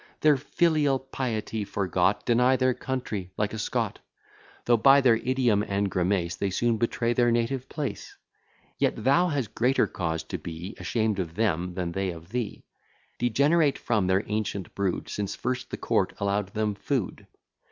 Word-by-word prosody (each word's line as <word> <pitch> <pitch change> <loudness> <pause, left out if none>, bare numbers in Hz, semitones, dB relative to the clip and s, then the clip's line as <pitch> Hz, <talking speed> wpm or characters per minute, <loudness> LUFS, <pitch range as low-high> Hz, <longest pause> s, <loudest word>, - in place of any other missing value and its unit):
Their 150 -1 +6
filial 150 0 +2
piety 120 -5 -3
forgot, 95 -1 0
Deny 125 +2 +4
their 130 0 +2
country, 115 -8 -4
like 105 0 -1
a 110 - -4
Scot; 105 - -2 0.7
Though 120 - +5
by 135 +5 +6
their 125 -4 +4
idiom 125 -4 +1
and 100 -1 -1
grimace, 90 -1 0
They 100 - -1
soon 115 +4 +1
betray 115 +1 0
their 120 0 +3
native 120 +3 0
place: 145 -4 -5 0.6
Yet - - 0
thou 155 +7 +4
hast 140 -9 -2
greater 125 +3 +2
cause 80 -3 -3
to - - -5
be 85 +5 -7
Ashamed 110 -3 0
of 85 -3 -4
them, 90 -4 0
than 90 -2 -2
they 95 +2 -1
of 85 0 -8
thee, 120 -1 -4 0.5
Degenerate 140 +6 +3
from 105 -6 0
their 95 +2 +2
ancient 105 -3 -3
brood 100 -3 -1
Since 100 -2 -3
first 130 +1 -3
the - - -5
court - - 0
allow'd 100 0 0
them 105 -1 0
food. 110 0 -3
110 Hz, 165 wpm, -27 LUFS, 95-130 Hz, 0.7 s, Their